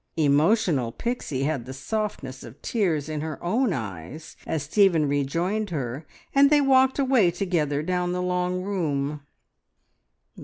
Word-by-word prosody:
Emotional 150 - +2
Pixie 155 - -3
had 140 -5 -2
the 130 - -7
softness 140 -5 -4
of 120 +4 -12
tears 170 - 0
in 155 -1 -3
her 155 -2 -4
own 225 +7 +1
eyes 110 - -6
as 155 -4 -1
Stephen 170 -1 +3
rejoined 170 +10 -1
her, 140 -2 -4 0.3
and 275 0 +6
they 300 0 +5
walked 265 -1 +4
away 260 -9 +4
together 165 -5 -1
down 180 +1 -1
the 180 - -2
long 180 0 -1
room. 150 -7 -2
165 Hz, 140 wpm, -25 LUFS, 140-200 Hz, 0.3 s, and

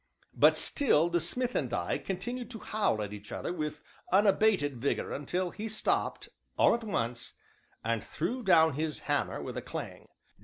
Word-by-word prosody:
But - - +5
still 170 - +3
the 175 0 +2
smith 250 +9 0
and 130 -5 -1
I 105 -8 -1
continued 240 +6 -4
to 240 - -7
howl 210 - 0
at 105 0 -6
each 105 0 -10
other - - -3
with 150 -3 -4 0.3
unabated 195 - +3
vigor 140 - -1
until 175 +5 -2
he 220 +1 -5
stopped, 215 - -1 0.3
all - - +5
at 235 0 -2
once, 120 - -3 0.5
and 115 -1 -1
threw 245 +11 -3
down 160 -7 +5
his 155 +2 -3
hammer - - -1
with - - -6
a - - -2
clang. - - -7
175 Hz, 165 wpm, -30 LUFS, 140-215 Hz, 0.5 s, But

